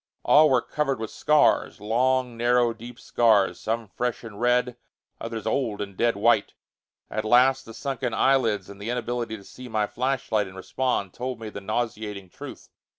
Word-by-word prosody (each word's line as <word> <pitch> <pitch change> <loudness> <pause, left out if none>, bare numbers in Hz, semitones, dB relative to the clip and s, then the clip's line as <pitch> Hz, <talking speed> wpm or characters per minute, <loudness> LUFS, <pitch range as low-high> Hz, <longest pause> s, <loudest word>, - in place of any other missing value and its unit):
All 150 +1 +6
were 125 -3 +3
covered 135 -5 -1
with 110 -1 -5
scars; 150 -7 +2
long, 125 +3 +1
narrow, 120 0 +2
deep 120 +2 -11
scars, 110 -6 +2
some 115 0 -2
fresh 125 +5 -3
and 110 -1 -9
red, 125 0 +2 0.4
others 115 -1 -5
old 115 -7 -1
and 100 -2 -5
dead 115 +2 +1
white. 110 0 +2 0.6
At 110 - -2
last, 125 +4 +4
the 115 - -10
sunken 135 -3 -3
eyelids 110 -5 +2
and 100 0 -12
the 105 - -4
inability 120 -2 -3
to 100 - -14
see 125 +5 -11
my 110 -3 0
flashlight 120 -3 -1
and 95 0 -12
respond 100 -2 -2
told 125 0 -5
me 110 -1 -6
the 100 -1 -8
nauseating 105 -3 -4
truth. - - -10
115 Hz, 170 wpm, -25 LUFS, 105-125 Hz, 0.6 s, All